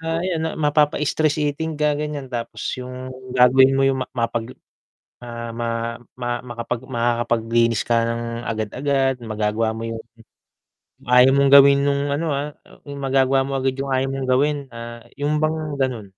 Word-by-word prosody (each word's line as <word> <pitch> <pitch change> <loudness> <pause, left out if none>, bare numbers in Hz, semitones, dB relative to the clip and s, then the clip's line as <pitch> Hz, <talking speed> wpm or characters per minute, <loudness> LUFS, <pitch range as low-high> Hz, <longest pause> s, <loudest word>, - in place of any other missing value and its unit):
Ah, 165 0 -2
ayan 180 -3 -1
na 160 - -1
mapapa-stress 150 0 +1
eating 155 +1 -2
ka, 150 0 +2
ganyan, 150 -2 -4
tapos 120 -1 -5 0.2
yung 130 +1 -7 0.2
gagawin 130 +2 +6
mo 135 - +2
yung 135 -1 +2
ma - - -6
mapaglu 115 0 -2 0.6
ah 115 -1 -7
ma 115 0 -3 0.2
ma 120 -1 -2
makapag 120 0 -4
makakapaglinis 115 -2 +1
ka 115 -1 +2
ng 115 0 -2 0.2
agad-agad, 135 +5 0
magagawa 110 0 -1
mo 110 - -6
yung 115 0 -4 1.1
ayaw 125 +1 +7
mong 140 0 +4
gawin 140 0 +8
nung, 140 0 +1
ano, 160 +3 -1
ah, 145 +2 -3 0.3
yung 140 -1 -7
magagawa 135 0 +2
mo 135 0 -2
agad 135 0 0
yung 140 - -4
ayaw 130 0 +1
mong 135 -1 -3
gawin, 145 +4 +2
ah, 115 0 -9 0.2
yung 150 +2 0
bang, 155 +1 +1 0.2
ganun. 120 -6 -2
130 Hz, 160 wpm, -21 LUFS, 115-140 Hz, 1.1 s, gawin